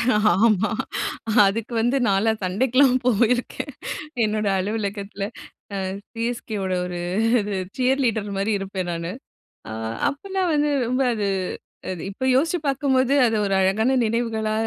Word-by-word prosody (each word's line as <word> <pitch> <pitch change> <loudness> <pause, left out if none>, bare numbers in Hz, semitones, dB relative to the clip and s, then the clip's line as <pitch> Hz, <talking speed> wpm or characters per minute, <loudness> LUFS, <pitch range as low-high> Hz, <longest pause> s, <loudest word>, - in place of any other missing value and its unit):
ஆமா. 210 -1 +3 0.8
அதுக்கு 225 +4 -2
வந்து 240 +4 +2
நான்லான் 215 +2 +2
சண்டைக்குலாம் 255 +8 +3
போயிருக்கேன். 245 +4 +1 0.5
என்னோட 215 -1 0
அலுவலகத்தில. 200 0 -3 0.5
அ - - -2 0.4
சிஎஸ்கேவோட 230 -5 -3
ஒரு 180 -1 -5 0.4
இது 205 -1 -3 0.2
சியர் 260 +2 +2
லீடர்மாரி 205 -2 -1
இருப்பேன் 190 -2 -4
நானு. 170 +1 -3 0.6
அ - - -6 0.4
அப்பல்லாம் 380 +5 -2
வந்து 295 0 +2 0.2
ரொம்ப 255 +2 0
அது 205 -2 -1 0.6
அது 180 -3 -5
இப்போ 205 +7 -5
யோசிச்சு 325 +7 +2
பார்க்கும்போது 270 -1 +2
அது 225 -1 +1
ஒரு 195 -1 0
அழகான 215 +7 +2
நினைவுகளா 225 -1 0
220 Hz, 120 wpm, -23 LUFS, 200-255 Hz, 0.8 s, ஆமா